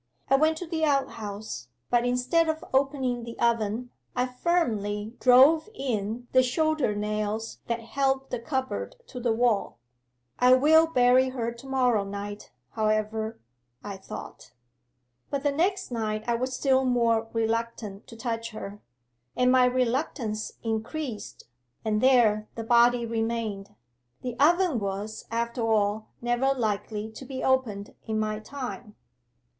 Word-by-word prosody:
I -, -, +8 dB
went 315 Hz, +3 st, +3 dB
to 355 Hz, -, -5 dB
the 325 Hz, -1 st, -2 dB
outhouse, 215 Hz, -, -2 dB, 0.2 s
but 240 Hz, 0 st, +3 dB
instead 255 Hz, +7 st, +2 dB
of 315 Hz, 0 st, -2 dB
opening 265 Hz, -3 st, +1 dB
the 235 Hz, 0 st, -8 dB
oven, 235 Hz, +1 st, 0 dB, 0.2 s
I 250 Hz, 0 st, +2 dB
firmly 230 Hz, -, -1 dB
drove 275 Hz, +8 st, +6 dB
in 235 Hz, -, -3 dB
the 255 Hz, -, +6 dB
shoulder 285 Hz, -2 st, +1 dB
nails 210 Hz, +1 st, -2 dB
that 235 Hz, -1 st, -1 dB
held 270 Hz, +3 st, -1 dB
the 245 Hz, -, -2 dB
cupboard 260 Hz, +2 st, -3 dB
to 255 Hz, -, -8 dB
the 240 Hz, -1 st, +1 dB
wall. 225 Hz, -, +1 dB, 0.6 s
"I 250 Hz, +1 st, +6 dB
will 315 Hz, +5 st, +5 dB
bury 255 Hz, -3 st, +4 dB
her 235 Hz, -3 st, -2 dB
to 235 Hz, +3 st, -12 dB
morrow 250 Hz, -5 st, +2 dB
night, 205 Hz, +1 st, -6 dB, 0.2 s
however," 215 Hz, 0 st, -1 dB, 0.4 s
I 205 Hz, -1 st, -5 dB
thought. 190 Hz, -, -10 dB, 0.8 s
'But 280 Hz, -1 st, -2 dB
the 290 Hz, -, +2 dB
next 370 Hz, +3 st, 0 dB
night 215 Hz, -2 st, -2 dB
I 235 Hz, -, +2 dB
was 255 Hz, +2 st, -1 dB
still 265 Hz, 0 st, +3 dB
more 230 Hz, -3 st, +2 dB
reluctant 225 Hz, -2 st, -2 dB
to 230 Hz, -, -11 dB
touch 230 Hz, -1 st, -3 dB
her. 205 Hz, -1 st, -7 dB, 0.5 s
And 250 Hz, 0 st, +3 dB
my 255 Hz, -1 st, +6 dB
reluctance 250 Hz, -3 st, -1 dB
increased, 225 Hz, +2 st, -4 dB, 0.4 s
and 215 Hz, -1 st, +1 dB
there 225 Hz, -5 st, +4 dB
the 225 Hz, -, -4 dB
body 235 Hz, +1 st, +4 dB
remained. 225 Hz, -, -3 dB, 0.5 s
The 250 Hz, -2 st, -3 dB
oven 340 Hz, -2 st, +4 dB
was, 200 Hz, +2 st, -4 dB
after 235 Hz, +1 st, -2 dB
all, 215 Hz, -1 st, +1 dB, 0.2 s
never 240 Hz, +3 st, +2 dB
likely 215 Hz, -2 st, -2 dB
to 220 Hz, -, -10 dB
be 260 Hz, 0 st, -6 dB
opened 225 Hz, -6 st, 0 dB
in 220 Hz, -1 st, 0 dB
my 215 Hz, 0 st, -1 dB
time. 245 Hz, -2 st, -7 dB
235 Hz, 140 wpm, -27 LUFS, 215-260 Hz, 0.8 s, I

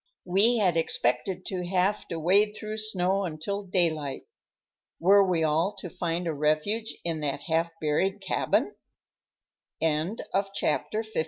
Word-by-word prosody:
We 200 Hz, +7 st, +4 dB
had 185 Hz, -6 st, +2 dB
expected 165 Hz, +5 st, 0 dB
to 185 Hz, -2 st, -3 dB
have 185 Hz, +3 st, 0 dB
to 165 Hz, -, -4 dB
wade 200 Hz, +6 st, +3 dB
through 215 Hz, 0 st, -6 dB
snow 195 Hz, -2 st, 0 dB
until 180 Hz, +4 st, -3 dB
daylight. 165 Hz, -7 st, 0 dB, 0.8 s
Were 200 Hz, +3 st, +6 dB
we 180 Hz, -4 st, +1 dB
all 160 Hz, +6 st, +1 dB
to 185 Hz, -3 st, -7 dB
find 175 Hz, -1 st, -2 dB
a 165 Hz, -, -1 dB
refuge 155 Hz, +10 st, 0 dB
in 165 Hz, -2 st, -1 dB
that 145 Hz, -1 st, -2 dB
half 165 Hz, +1 st, 0 dB
buried 185 Hz, +7 st, 0 dB
cabin? 195 Hz, -2 st, 0 dB, 1.1 s
CHAPTER 160 Hz, +6 st, -1 dB, 0.8 s
LV. 220 Hz, -4 st, -4 dB
180 Hz, 135 wpm, -27 LUFS, 160-200 Hz, 1.1 s, Were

